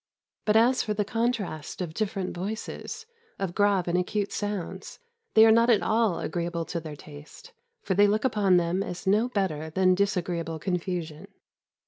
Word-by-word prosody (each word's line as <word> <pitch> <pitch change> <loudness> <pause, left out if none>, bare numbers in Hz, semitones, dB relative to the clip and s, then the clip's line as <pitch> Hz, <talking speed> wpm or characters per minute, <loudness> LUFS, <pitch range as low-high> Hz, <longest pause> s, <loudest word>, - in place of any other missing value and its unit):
But 210 - +2
as 240 +3 +4
for 210 -2 -2
the 210 0 0
contrast 220 -8 -2
of 175 -4 -4
different 195 -2 -3
voices, 215 - -5 0.3
of 190 -3 -3
grave 200 -3 +2
and 170 - 0
acute 200 +3 -1
sounds, 205 -4 -4 0.4
they 220 0 +9
are 225 - +7
not 230 +2 +4
at 225 -4 +4
all 220 -5 +2
agreeable 170 0 -3
to 170 - -1
their 155 -2 -8
taste, 145 - -13 0.3
for 190 - 0
they 205 +2 +5
look 215 +3 +1
upon 200 -7 +3
them 175 +2 0
as 180 -2 -5
no 210 +6 +3
better 165 -9 -2
than 185 +3 +3
disagreeable 175 -4 -1
confusion. 170 -2 -3
190 Hz, 165 wpm, -27 LUFS, 170-215 Hz, 0.4 s, they